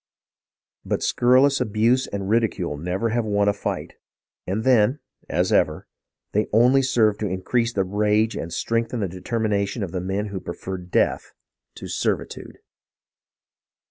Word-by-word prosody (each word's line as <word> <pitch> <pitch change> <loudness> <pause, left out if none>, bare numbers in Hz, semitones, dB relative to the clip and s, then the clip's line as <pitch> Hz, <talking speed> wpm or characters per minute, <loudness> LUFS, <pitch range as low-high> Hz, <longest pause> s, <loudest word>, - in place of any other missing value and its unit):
But - - -2
scurrilous 130 +3 +3
abuse 115 +3 +2
and 100 -1 -4
ridicule 105 -7 0
never 90 +9 -2
yet - - -3
have 120 - 0
won 100 -1 +1
a 105 - +3
fight, 100 - -4 0.5
and 100 +4 -1
then, 125 +1 +4 0.3
as - - +1
ever, - - +1 0.5
they 105 +1 +1
only 125 +5 +5
served 110 -5 +2
to 105 - -1
increase 115 +6 0
the 100 -5 0
rage 105 +3 +1
and 85 - -5
strengthen 115 +5 -1
the 100 - 0
determination 100 +3 -2
of 90 - -5
the 90 - -3
men 100 +3 -2
who 100 -1 -4
preferred 90 0 -7
death - - 0 0.4
to - - -8
servitude. - - -3
105 Hz, 145 wpm, -23 LUFS, 95-115 Hz, 0.5 s, only